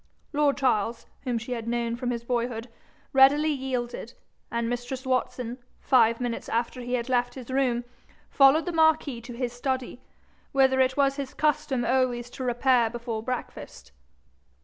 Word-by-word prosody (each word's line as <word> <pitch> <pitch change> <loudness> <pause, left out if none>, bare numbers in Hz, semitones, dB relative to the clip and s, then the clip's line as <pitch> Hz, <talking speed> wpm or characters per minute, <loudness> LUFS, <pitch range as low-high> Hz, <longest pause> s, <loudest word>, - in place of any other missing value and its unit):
Lord 290 -1 +2
Charles, 235 -4 0 0.2
whom 245 -2 0
she 235 +2 -6
had 230 -2 -3
known 235 0 -1
from 245 0 -3
his 235 -1 -3
boyhood, 235 -1 -2 0.5
readily 285 +3 +6
yielded, 255 -4 -3 0.4
and 235 0 -1
mistress 245 +2 -4
Watson, 255 -1 -1 0.2
five 230 -3 +4
minutes 245 -2 -3
after 235 +2 -1
he 245 +1 -2
had 235 0 -2
left 245 -1 0
his 255 -1 -8
room, 255 -3 +1 0.4
followed 275 +3 +5
the 355 - -2
marquis 315 -6 +2
to 240 +1 -9
his 240 0 -3
study, 255 0 -3 0.5
whither 265 -1 +4
it 260 +1 +2
was 275 0 +2
his 275 -2 -5
custom 300 -5 0
always 245 -1 0
to 260 - -6
repair 245 -1 +3
before 235 -1 -4
breakfast. 220 - -6
250 Hz, 155 wpm, -26 LUFS, 235-265 Hz, 0.5 s, readily